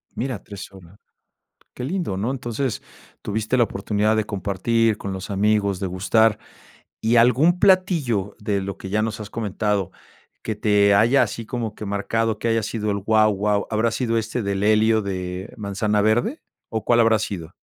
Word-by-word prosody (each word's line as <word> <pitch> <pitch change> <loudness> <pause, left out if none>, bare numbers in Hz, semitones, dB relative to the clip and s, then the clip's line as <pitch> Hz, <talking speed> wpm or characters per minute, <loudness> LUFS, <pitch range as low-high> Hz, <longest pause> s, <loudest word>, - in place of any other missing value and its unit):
Mira, 125 -4 -4
3 100 -1 -9
horas. 95 +2 -16 0.7
Qué 125 - -7
lindo, 160 - -2
¿no? 115 +6 -1
entonces, 125 -2 -3 0.4
tuviste 110 +4 -2
la 120 - +5
oportunidad 105 +1 0
de 110 -1 0
compartir 105 +3 0
con 100 - -5
los 95 +1 -6
amigos, 100 -1 +1
degustar, 105 +4 +2 0.6
y 115 +2 +2
algún 130 +10 +4
platillo 160 - +2
de 100 -1 -1
lo 100 0 -5
que 95 - -8
ya 105 +2 +1
nos 110 0 -3
has 105 -1 -7
comentado 105 -3 -2 0.5
que 110 - -3
te 105 -1 +3
haya 120 +6 +5
así 115 +1 -5
como 115 -3 -4
que 105 - -7
marcado, 110 +2 -1
que 115 - -2
haya 115 -1 +1
sido 105 0 -2
el 100 - -1
guau 110 +1 +3
guau, 105 +1 0
¿habrá 110 +1 +1
sido 115 -1 -1
este 115 +1 -2
del 100 0 -1
helio 110 +1 +3
de 95 -1 -5
manzana 105 +1 0
verde? 120 - +1 0.3
¿O 110 -1 -4
cuál 120 -1 +4
habrá 115 -2 +4
sido? 90 -5 -5
110 Hz, 175 wpm, -22 LUFS, 100-115 Hz, 0.7 s, la